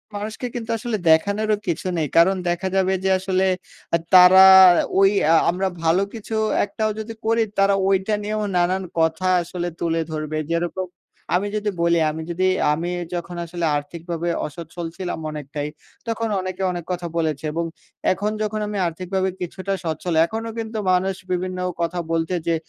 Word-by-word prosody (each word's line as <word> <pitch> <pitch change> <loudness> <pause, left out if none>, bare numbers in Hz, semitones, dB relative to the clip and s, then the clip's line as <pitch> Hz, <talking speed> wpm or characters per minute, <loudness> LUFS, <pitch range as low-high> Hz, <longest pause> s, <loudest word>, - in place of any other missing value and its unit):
মানুষকে 215 +4 -5
কিন্তু 235 -1 -5
আসলে 225 -1 -2
দেখানোরও 205 +6 +3
কিছু 170 +2 -2
নেই। 155 - 0
কারণ 185 +3 +6
দেখা 175 +2 -1
যাবে 190 0 +2
যে, 190 - +1
আসলে 190 0 0 0.5
অ্যা 170 - +4 0.2
তারা 185 +1 +9 0.6
ওই 195 0 +6 0.2
আ - - +6
আমরা 185 +2 0 0.2
ভালো 165 +3 +3
কিছু 225 -1 -6 0.3
একটাও 215 +1 -2
যদি 225 +1 -6
করি, 225 +1 +3 0.2
তারা 195 0 +4
ঐটা 195 +2 +1
নিয়েও 215 +1 -2
নানান 180 +2 +1 0.2
কথা 160 +3 +1
আসলে 175 0 -4
তুলে 165 -1 0
ধরবে। 155 0 -3
যেরকম, 175 +2 -1 0.5
আমি 200 +3 +1
যদি 210 0 -1
বলি, 170 0 +3
আমি 160 - -6
যদি 185 +2 0 0.3
আমি 170 +3 -3 0.3
যখন 175 0 -5
আসলে 170 0 -3
আর্থিকভাবে 170 +3 -4 0.2
অসচ্ছল 165 +2 -8
ছিলাম 180 -3 -4
অনেকটাই, 150 -1 -5 0.4
তখন 230 0 -1
অনেকে 185 0 -5
অনেক 175 -2 -5
কথা 175 -1 -3
বলেছে 155 -3 -1
এবং 170 +1 -1 0.5
এখন 205 +3 -1
যখন 215 0 -1
আমি 205 0 -4
আর্থিকভাবে 185 +3 -2
কিছুটা 185 +2 -3
স্বচ্ছল, 165 +1 -3
এখনও 225 +4 -5
কিন্তু 220 0 -4
মানুষ 185 +1 +1 0.2
বিভিন্ন 185 0 -2 0.2
কথা 170 +1 -1
বলছে 165 +2 0
যে, 165 - +3
180 Hz, 160 wpm, -22 LUFS, 170-200 Hz, 0.6 s, তারা